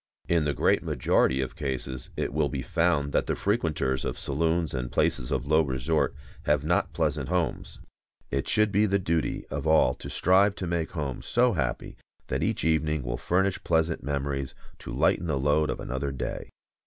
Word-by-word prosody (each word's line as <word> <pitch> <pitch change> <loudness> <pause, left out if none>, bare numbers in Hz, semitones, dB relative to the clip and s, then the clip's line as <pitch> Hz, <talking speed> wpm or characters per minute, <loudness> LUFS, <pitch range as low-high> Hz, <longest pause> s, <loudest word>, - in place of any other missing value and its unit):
In 85 -3 +2
the 75 - 0
great - - +3
majority 65 +1 +2
of 65 - -4
cases 65 -2 -4
it - - -2
will 75 -1 +1
be 70 -3 -3
found 80 0 +1
that - - +1
the - - 0
frequenters 80 - 0
of - - -3
saloons 80 +3 0
and 60 -2 -3
places 60 -1 0
of - - -1
low 80 +2 +4
resort 70 +1 0 0.3
have 75 -1 +2
not 85 +3 +1
pleasant 75 -3 -1
homes. 90 -2 -2 0.5
It 70 - -1
should 110 -1 +3
be 105 +2 +3
the 100 0 +2
duty 85 -4 -1
of - - -3
all 80 -5 +5
to - - -9
strive 95 +3 +3
to 95 - -4
make 85 -2 -2
home 75 -6 -3
so 120 0 +2
happy 65 -7 -3 0.3
that - - -1
each - - -1
evening 80 -2 +1
will - - -3
furnish 95 +7 0
pleasant 80 0 +1
memories 70 -1 -3 0.2
to - - -8
lighten 85 - +2
the 75 -4 0
load 75 +2 +2
of - - -2
another 65 +2 -3
day. 65 - -5
75 Hz, 185 wpm, -27 LUFS, 70-85 Hz, 0.5 s, all